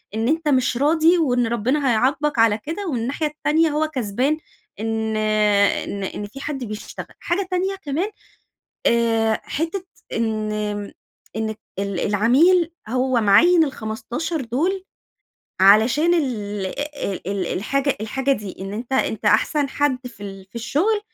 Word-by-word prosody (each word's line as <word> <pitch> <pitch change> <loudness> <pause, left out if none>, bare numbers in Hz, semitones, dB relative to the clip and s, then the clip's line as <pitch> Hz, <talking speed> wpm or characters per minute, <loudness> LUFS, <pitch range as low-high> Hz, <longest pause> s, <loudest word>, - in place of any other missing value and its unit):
إن 225 +1 0
أنت 320 +2 0
مش 255 -3 +2
راضي 320 +5 +4
وإن 245 -7 +2
ربنا 255 +5 +1
هيعاقبك 270 +4 +1
على 225 -2 +5
كده 330 - -5
ومن 255 -7 -1
الناحية 275 +7 -1
التانية 300 +2 +1
هو 305 +1 0
كسبان 260 +2 -1 0.4
إن 220 0 -1
إن 210 -2 +2
إن 205 +2 -4
في 240 +7 -11
حد 285 -4 -4
بيشتغل. 215 -2 -7
حاجة 365 +2 -1
تانية 375 +2 0
كمان، 340 +2 -2 0.8
آآ 225 -1 +2
حتّة 335 +5 -3 0.3
إن 220 -2 -1 0.9
إن 220 0 -2 0.2
ال 200 -2 -2
العميل 300 - +3 0.2
هو 255 +1 +1
معين 325 - +6
ال15 255 +5 -4
دول 320 +11 -1 0.8
علشان 235 - +5
ال 210 - -2 0.3
ال 190 -5 -4
ال 195 -3 -1
الحاجة 275 +10 0
الحاجة 265 +6 0
دي، 205 -7 -5
إن 195 +1 -5
أنت 235 +5 -6
أنت 220 -5 0
أحسن 280 +7 +3
حد 265 -2 -1
في 205 -5 -11
ال 195 -1 -8
في - - -39
الشغل، 315 - +1
250 Hz, 140 wpm, -22 LUFS, 215-305 Hz, 0.9 s, معين